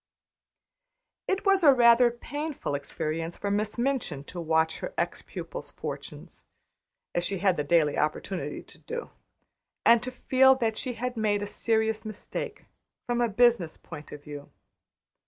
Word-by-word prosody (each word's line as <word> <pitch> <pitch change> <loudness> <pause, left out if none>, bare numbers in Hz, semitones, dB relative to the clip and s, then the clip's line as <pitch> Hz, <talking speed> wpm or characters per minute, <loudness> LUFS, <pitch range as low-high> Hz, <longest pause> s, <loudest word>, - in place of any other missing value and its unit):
It 385 +1 -1
was 390 -2 +4
rather 245 -4 +7
a - - 0
painful 290 - -5
experience 155 +4 -3
for 200 - -2
Miss 210 +2 0
Minchin 240 - -1
to 175 +4 -7
watch 160 0 +1
her - - -6
ex - - -1
pupil's - - -7
fortunes, - - -8 0.7
as 175 - 0
she 195 +2 -1
had 190 0 +2
the 150 - -1
daily 150 -1 +2
opportunity 150 0 -2
to - - -18
do, 480 0 -6 0.7
and 235 -1 +7
to 250 - -4
feel 260 +1 +4
that 225 -4 0
she 250 +3 -3
had 250 +1 -4
made 205 -2 +1
a - - -2
serious 220 +1 +1
mistake, 225 - -5 0.4
from 240 0 0
a 235 - +2
business 220 -6 +3
point 150 - -10
of 145 -1 -9
view. 145 -1 -9
220 Hz, 155 wpm, -28 LUFS, 165-245 Hz, 0.7 s, rather